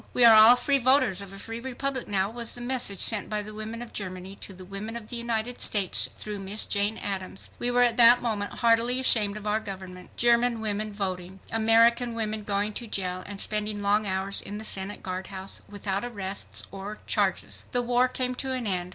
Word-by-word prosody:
"We 245 - +6
are 230 - +9
all 220 +3 +9
free 275 +3 +1
voters 255 -6 +3
of 200 -1 -9
a 195 - -10
free 225 +3 -6
republic 265 +1 -4
now," 195 0 0
was 235 0 -2
the - - -7
message 240 -6 -1
sent 215 -3 +2
by 210 -1 -2
the 215 +1 -9
women 220 +2 -6
of 240 - -12
Germany 185 -1 -5
to - - -9
the 185 -1 -11
women 200 +4 -6
of 230 -2 -7
the - - -3
United 235 0 -2
States 200 -4 +2
through 210 -1 -5
Miss 195 +2 0
Jane 205 +1 0
Addams. 190 -1 -5
We 245 - -1
were 245 0 +4
at 235 -2 +1
that 240 0 +8
moment 210 -4 -2
heartily 235 +2 +2
ashamed 215 -5 +3
of 210 - -9
our 210 +1 +1
government. 190 -3 -9
German 235 0 +3
women 215 0 -2
voting! 190 -2 -4
American 230 +2 +3
women 215 -1 -3
going 205 +1 -1
to 235 - -8
jail 185 -3 -2
and 200 -1 -8
spending 210 -1 -2
long 205 +1 +2
hours 190 +1 -1
in 205 +1 -7
the 220 - -7
Senate 195 0 -4
guardhouse 190 +1 -3
without 200 0 -3
arrests 200 -5 -4
or, 200 +2 -7
charges. - - -1
The 245 -1 +1
war 245 +1 +3
came 255 0 -2
to 260 +1 -3
an 255 -2 -3
end. 180 -3 -2
215 Hz, 210 wpm, -27 LUFS, 195-235 Hz, -, are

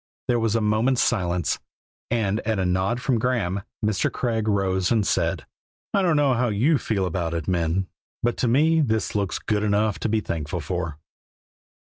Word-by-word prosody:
There 120 -1 +2
was 115 -1 +1
a 115 - +2
moment's 110 +5 +2
silence, 90 - 0 0.5
and 110 -3 0
at 110 -1 -1
a 95 - 0
nod 95 +6 0
from 130 -3 +1
Graeme 110 -6 0 0.2
Mr. 105 -3 +1
Craig 115 -3 -1
rose 95 -3 +1
and 110 -3 +2
said: 85 -2 0 0.5
"I 200 - +3
don't 175 -4 +3
know 145 -3 +3
how 125 +1 +1
you 125 +8 +2
feel 100 -4 -1
about 85 -2 -2
it, 80 -3 -3
men, 90 +1 0 0.4
but 120 0 +1
to 125 - +1
me 155 +7 +4
this 110 -6 0
looks 100 -3 -1
good 105 -1 -1
enough 105 0 +1
to - - -1
be 110 +1 +2
thankful 80 -4 -3
for." 85 0 -3
105 Hz, 180 wpm, -24 LUFS, 95-120 Hz, 0.5 s, me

